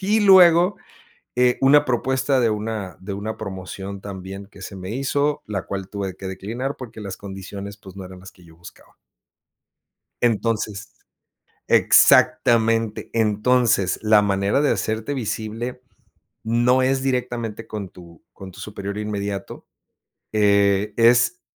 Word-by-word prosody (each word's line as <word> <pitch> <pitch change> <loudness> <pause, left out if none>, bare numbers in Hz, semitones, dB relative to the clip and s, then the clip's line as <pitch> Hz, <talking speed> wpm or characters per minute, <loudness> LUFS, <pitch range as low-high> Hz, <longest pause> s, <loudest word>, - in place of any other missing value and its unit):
y 210 +3 +2
luego, 180 -1 +6 0.6
eh, 125 0 +3
una 145 +2 +5
propuesta 130 +2 +1
de 115 -2 +2
una 105 -4 -4
de 100 +1 -6
una 105 +3 -5
promoción 95 0 -7
también 95 0 -8
que 100 - -16
se 95 +1 -8
me 95 0 -7
hizo, 140 +4 -1
la 100 -3 -3
cual 95 -1 -6
tuve 100 -2 -5
que 95 - -9
declinar 110 +9 -5
porque 115 -3 -10
las 100 -2 -6
condiciones, 100 +1 -8
pues, 95 -1 -14
no 95 - -7
eran 90 0 -11
las 95 - -12
que 90 - -21
yo 80 -1 -17
buscaba. 85 +1 -16 1.3
Entonces 110 -2 -1 0.7
exactamente, 115 -1 +4
entonces, 110 -2 +2
la 110 -1 +5
manera 100 +5 +1
de 150 - +2
hacerte 110 +6 -2
visible 115 +1 -4 0.6
no 120 +3 +2
es 130 +1 +1
directamente 120 -4 -3
con 105 -3 -5
tu 85 -3 -16
con 95 -1 -11
tu 95 - -16
superior 100 0 -6
inmediato. 100 -2 -5 0.7
Eh, 100 -1 +2
es 120 +10 +4
105 Hz, 135 wpm, -22 LUFS, 100-125 Hz, 1.3 s, luego